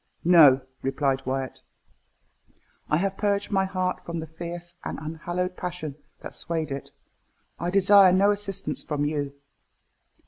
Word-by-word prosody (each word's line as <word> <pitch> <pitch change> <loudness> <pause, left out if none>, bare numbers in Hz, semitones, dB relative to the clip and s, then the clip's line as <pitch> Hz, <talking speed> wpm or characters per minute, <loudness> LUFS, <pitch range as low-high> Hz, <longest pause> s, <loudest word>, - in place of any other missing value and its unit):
"No," 150 -7 +7 0.2
replied 135 -1 -1
Wyat, 130 -1 -3 1.3
"I 150 - +3
have 195 +2 -1
purged 200 0 0
my 190 -1 +2
heart 185 -1 -2
from 170 -1 -4
the 160 - -5
fierce 170 +2 -7
and - - -4
unhallowed 175 +4 -4
passion 180 -5 -5 0.3
that - - -8
swayed 160 -3 -3
it. 135 0 -5 0.7
I 175 - -1
desire 195 0 +6
no 195 +3 +4
assistance 200 -2 -2
from 145 -1 -2
you." 145 -2 -2
170 Hz, 135 wpm, -26 LUFS, 150-190 Hz, 1.3 s, No